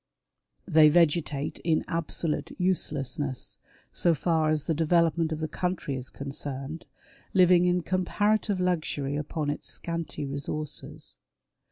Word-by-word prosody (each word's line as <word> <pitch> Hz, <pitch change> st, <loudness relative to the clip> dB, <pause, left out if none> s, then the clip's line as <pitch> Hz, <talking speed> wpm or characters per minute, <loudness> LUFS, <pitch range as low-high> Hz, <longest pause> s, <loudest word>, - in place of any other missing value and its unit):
They 155 Hz, -4 st, +7 dB
vegetate 150 Hz, -3 st, +1 dB
in 160 Hz, -2 st, +1 dB
absolute 165 Hz, -1 st, -2 dB
uselessness, 145 Hz, -7 st, -1 dB, 0.3 s
so 170 Hz, -2 st, +3 dB
far 160 Hz, 0 st, +1 dB
as 155 Hz, -1 st, +1 dB
the 160 Hz, -, 0 dB
development 165 Hz, 0 st, +2 dB
of 155 Hz, -, -2 dB
the 155 Hz, -, -1 dB
country 180 Hz, -2 st, -2 dB
is 130 Hz, -1 st, -4 dB
concerned, 140 Hz, +2 st, -5 dB, 0.5 s
living 180 Hz, -1 st, +6 dB
in 180 Hz, 0 st, +2 dB
comparative 205 Hz, +3 st, +1 dB
luxury 155 Hz, -6 st, -1 dB
upon 150 Hz, 0 st, -2 dB
its 145 Hz, -, -6 dB
scanty 165 Hz, -3 st, -4 dB
resources. 145 Hz, +2 st, -4 dB
160 Hz, 120 wpm, -27 LUFS, 145-175 Hz, 0.5 s, They